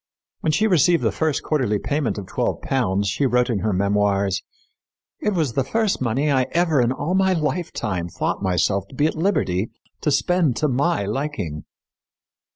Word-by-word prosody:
When 155 - 0
she 215 +8 +2
received 175 -4 +3
the - - +2
first 160 -3 -1
quarterly 130 -9 +1
payment 145 +3 -1
of 100 - -5
twelve - - -2
pounds 100 -7 0
she 115 +8 +1
wrote 125 0 +2
in 105 - 0
her 105 +3 0
memoirs, 100 0 +1 0.8
"It 210 -2 -1
was 155 -8 0
the 135 - +1
first 220 - 0
money 130 +5 +1
I 130 -2 +2
ever 165 -5 +3
in 120 0 +2
all 145 +6 -2
my 190 0 +3
lifetime 135 - -2
thought - - -2
myself 95 +1 +1
to 130 - -14
be 145 - +2
at 155 - +1
liberty 115 - 0 0.3
to - - +1
spend 165 -2 +2
to 155 - +1
my 140 -1 +1
liking." 105 - -3
130 Hz, 175 wpm, -22 LUFS, 100-160 Hz, 0.8 s, received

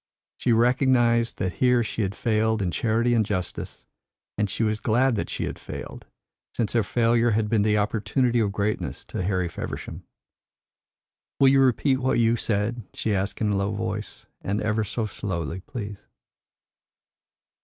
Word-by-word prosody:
She 125 - +1
recognised 120 0 +3
that 90 -1 -2
here 125 -2 +4
she 110 - -3
had 100 0 -1
failed 110 0 +1
in 95 -4 -1
charity 115 +7 +1
and 115 -2 +3
justice, 95 -4 -4 0.5
and 105 -1 0
she 115 - -1
was 110 -1 0
glad 125 +5 +2
that 105 - -2
she - - -3
had - - -4
failed, - - -8 0.5
since 115 -4 0
her 115 - +3
failure 115 +2 +2
had 110 -1 +1
been 110 -2 +3
the 105 0 +2
opportunity 115 +4 +1
of 105 -3 +1
greatness 105 +1 -2
to - - -3
Harry 90 -1 0
Feversham. 85 - -6 1.4
"Will 135 - +7
you 135 0 +5
repeat 130 +1 +3
what 130 0 +1
you 115 0 +3
said?" 110 +1 -1
she 110 - -1
asked 100 +3 -2
in 105 -2 +2
a - - +1
low 100 +1 0
voice; 105 0 -5 0.2
"and 100 +2 -1
ever 110 0 0
so 110 +2 -2
slowly, 90 -5 -4
please." 105 0 -8
110 Hz, 165 wpm, -25 LUFS, 100-120 Hz, 1.4 s, Will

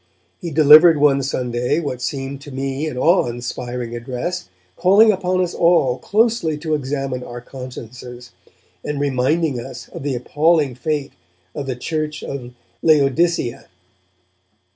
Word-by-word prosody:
He 175 - -5
delivered 155 +2 +7
one 140 -1 +3
Sunday 125 0 -1
what 135 -6 -4
seemed 135 +1 -4
to 145 - -11
me 135 +3 -3
an 130 - -5
awe 170 +3 +3
inspiring 120 0 -5
address, 125 - -4 0.3
calling 200 +5 +5
upon 185 -1 0
us 175 - -3
all 165 -7 +3
closely 215 -7 +1
to 155 0 -3
examine 135 -3 -2
our 120 0 -8
consciences, 125 -1 -10 0.5
and 150 -1 -3
reminding 140 +1 0
us 120 -1 -9
of - - -9
the 140 -1 -2
appalling 150 +2 +1
fate 145 +3 -3 0.4
of 140 - -5
the 130 - -2
church 155 +4 -4
of 125 -3 -6 0.3
Laodicea. 150 -3 +2
140 Hz, 135 wpm, -20 LUFS, 125-160 Hz, 0.5 s, delivered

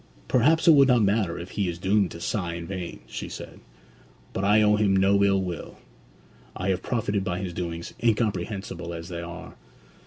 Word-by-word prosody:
'Perhaps 155 +8 +3
it - - +10
will 140 -3 +7
not 125 -4 +4
matter 100 -4 +1
if 90 +2 -8
he 100 -4 -1
is 85 - -4
doomed 95 +1 +2
to 85 - -9
sigh 85 -1 -2
in 85 -1 -6
vain,' 90 -2 -6
she - - -6
said. - - -9 0.7
'But 95 - -2
I 105 +2 +5
owe 105 0 +5
him 105 -2 +2
no 100 +1 +4
ill 100 -1 +3
will. 90 -3 -6 0.8
I 90 - -2
have 95 -1 0
profited 105 -4 -1
by 90 -2 -2
his 95 -1 -4
doings, 85 -1 -5
incomprehensible 95 -6 -1
as 85 +1 -8
they 85 -1 -5
are.' 90 +1 -8
95 Hz, 190 wpm, -26 LUFS, 85-105 Hz, 0.8 s, it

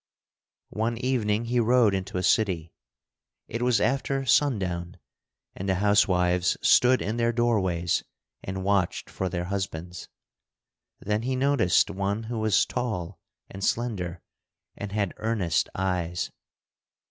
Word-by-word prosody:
One 115 +2 -1
evening 120 -3 0
he 120 +1 +1
rode 120 -2 +4
into 95 -1 -3
a 90 - -1
city. 90 -6 +1 0.7
It 115 - -4
was 120 -3 +3
after 135 +2 0
sundown, 95 -11 +1 0.6
and 95 +1 -4
the 95 - +2
housewives 90 -3 +2
stood 125 +1 +5
in 110 +3 -2
their 115 0 +2
doorways 95 -8 +1 0.4
and 95 0 -4
watched 100 -3 0
for 95 - -2
their 85 0 -3
husbands. 90 -3 -5 0.9
Then 105 +1 -1
he 130 +2 -1
noticed 130 -9 +3
one 100 +3 -2
who 115 0 -4
was 110 -5 +3
tall 100 -8 -4 0.3
and 95 0 -8
slender, 95 -9 -1 0.5
and 105 -1 -6
had 100 -2 -1
earnest 110 -7 0
eyes. 90 -2 -2
100 Hz, 125 wpm, -26 LUFS, 90-115 Hz, 0.9 s, stood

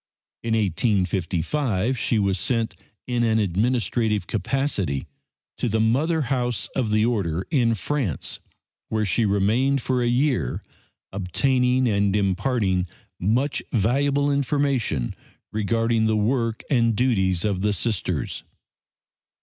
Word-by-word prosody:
In 115 -1 0
1855 100 - 0
she 115 -1 0
was 100 -2 +1
sent 115 -2 0 0.3
in 120 -1 -1
an 110 -1 +2
administrative 110 +1 0
capacity 110 - -1 0.5
to 120 - 0
the 110 +1 +1
mother 145 +9 +2
house 125 -2 -1
of 125 -5 0
the 105 +1 +3
Order 95 -7 -1
in 120 -7 +3
France, 115 - -2 0.5
where 110 -1 0
she 105 +3 +1
remained 110 +8 +2
for 125 0 0
a 120 - +1
year, 120 - 0 0.5
obtaining 125 - +1
and 100 -2 +2
imparting 95 -2 +1 0.3
much 120 +10 +1
valuable 140 +6 +2
information 140 - 0 0.4
regarding 115 +2 +1
the 110 0 +2
work 115 +1 0
and 115 -4 +3
duties 95 -8 +1
of 100 -2 -1
Sisters. 110 -3 -2
115 Hz, 115 wpm, -24 LUFS, 100-125 Hz, 0.5 s, the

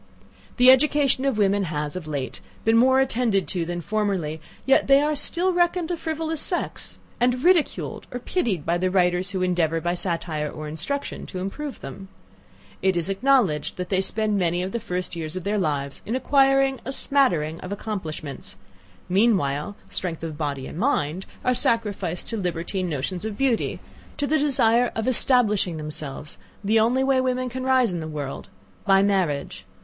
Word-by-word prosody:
The 250 0 +8
education 275 0 +3
of 270 -5 +1
women 200 -1 +2
has, 150 -2 -3
of 180 -4 -6
late, 140 -5 -4 0.2
been 225 +1 +4
more 260 +3 +5
attended 235 -6 +1
to 175 -3 -1
than 175 0 -3
formerly; 190 -6 -1 0.2
yet 270 - +4
they 275 0 +7
are 300 +1 +1
still 350 +5 0
reckoned 350 -1 +1
a - - +1
frivolous 320 -1 -3
sex, 350 - -3 0.2
and 250 +1 +1
ridiculed 350 -4 +1
or 245 - -3
pitied 235 - -1
by 170 +1 +1
the 185 +1 +1
writers 180 0 +2
who 190 -2 -2
endeavour 170 -3 +1
by 175 +1 -1
satire 165 -4 -2
or 155 +1 -7
instruction 175 - -4
to 185 - -7
improve 255 +10 -5
them. 165 +8 -8 0.7
It 190 -2 +2
is 170 +2 -1
acknowledged 200 - +2
that 180 -1 -4
they 190 -1 +2
spend 210 +1 0
many 175 0 +1
of 190 - -4
the 235 - -2
first 180 -5 -3
years 160 0 -4
of 185 - -4
their 205 +2 0
lives 140 -5 -2
in 225 - -3
acquiring 270 0 +3
a 265 - -4
smattering 175 - +2
of 185 - -8
accomplishments: 175 -9 -5 0.5
meanwhile, 185 -5 +1
strength 170 -3 -4
of 160 -2 -4
body 145 -3 -3
and 160 - -7
mind 185 - 0 0.2
are 250 - +3
sacrificed 205 -8 0
to 225 - -2
libertine 180 0 -2
notions 165 +5 -3
of 215 -2 -4
beauty, 265 -4 0 0.4
to 290 - 0
the 310 +2 +2
desire 245 -4 +3
of 220 +1 -2
establishing 220 -9 +2
themselves, 150 -1 -6 0.2
the 220 +3 +3
only 245 +4 +3
way 265 -1 +3
women 255 0 -1
can 255 +1 -5
rise 255 -6 +3
in 175 - -2
the 160 - -5
world 145 -3 -5 0.4
by 195 0 +4
marriage. 185 -8 0
195 Hz, 175 wpm, -24 LUFS, 170-255 Hz, 0.7 s, The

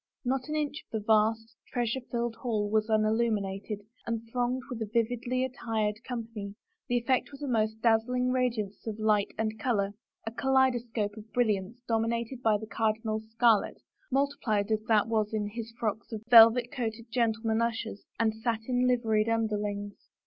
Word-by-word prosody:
Not 260 +2 0
an 305 - -1
inch 295 -1 -2
of - - -57
the 220 -3 -4
vast, 225 +1 +2 0.2
treasure 240 0 0
flUed 240 -1 -2
hall 220 -4 -1
was 215 0 +2
unillumined, 215 -2 0 0.2
and 230 0 -3
thronged 250 +1 0
with 245 -5 -6
a 215 - -3
vividly 245 +2 0
attired 225 -4 -2
company, 225 -5 -6 0.3
the 245 0 +2
eflFect 260 0 +1
was 280 +1 -9
a - - -2
most 220 -3 0
dazzling 250 +2 +2
radiance 230 -6 -1
of 215 -1 -3
light 215 -2 +2
and 220 0 -2
color 205 -5 0 0.2
— - - -39
a 225 - -3
kaleido 265 0 +3
scope 220 -3 -3
of 215 +1 -11
brilliance 225 0 0
dcwninated 230 +2 -1
by 220 -3 +3
the 220 - -7
cardinal's 220 0 -1
scarlet, 225 -2 +3 0.3
multiplied 255 -7 0
as 215 -1 +2
that 215 -2 +4
was 220 -1 0
in 210 -1 -1
his 230 +1 -6
flocks 220 0 -2
of 220 -1 -5
velvet 230 +1 +8
coated 230 -5 -3
gen 235 -2 +3
tlemen 225 0 -1
ushers 225 -3 -3
and 225 -1 +2
satin 235 +2 0
liveried 225 -3 +2
tmderlings. 210 -3 -1
225 Hz, 170 wpm, -29 LUFS, 215-245 Hz, 0.3 s, velvet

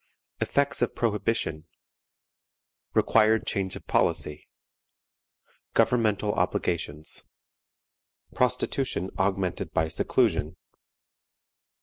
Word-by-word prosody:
Effects 140 -2 +1
of 120 - 0
Prohibition. 105 -8 -1 1.3
Required 110 0 +4
Change 95 -2 -1
of - - -10
Policy. 75 0 0 1.3
Governmental 105 -3 +2
Obligations. 75 -3 -1 1.1
Prostitution 125 -5 0
augmented 95 -2 -1
by 80 0 +2
Seclusion. 80 +1 +1
100 Hz, 65 wpm, -27 LUFS, 85-115 Hz, 1.3 s, Required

